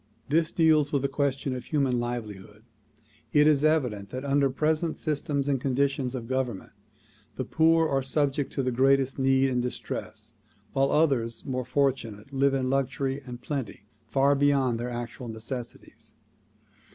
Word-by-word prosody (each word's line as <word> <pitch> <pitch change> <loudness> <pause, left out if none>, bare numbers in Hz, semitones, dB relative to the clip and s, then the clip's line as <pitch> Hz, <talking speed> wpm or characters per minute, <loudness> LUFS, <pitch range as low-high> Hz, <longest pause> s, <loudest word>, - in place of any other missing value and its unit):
This 160 +2 +2
deals 155 -3 +3
with 140 -2 0
the - - +2
question 135 -1 -1
of 125 - -7
human 135 -5 +1
livelihood. 105 -4 -6 0.7
It 150 0 +6
is 150 -2 +4
evident 125 -11 +1
that 130 +5 -6
under 140 0 +2
present 155 +4 0
systems 145 -2 -2
and 135 -3 0
conditions 135 -1 0
of 120 -3 -5
government 130 -5 -3 0.6
the - - -3
poor 165 0 +3
are 135 -2 +1
subject 140 +1 0
to 135 - -1
the 130 - 0
greatest 135 +2 +2
need 135 0 +3
and 125 -1 +1
distress 125 0 -5 0.4
while 135 0 +2
others 130 -7 +1
more 130 -3 -3
fortunate 125 -3 -1
live 135 0 +2
in 130 -1 0
luxury 135 +1 -1
and 120 0 -8
plenty 135 -8 -5 0.2
far 135 +4 +3
beyond 135 -4 +2
their 120 +1 -3
actual 120 0 -6
necessi 115 +2 -6
ties. 110 0 -17
135 Hz, 155 wpm, -27 LUFS, 125-140 Hz, 0.7 s, It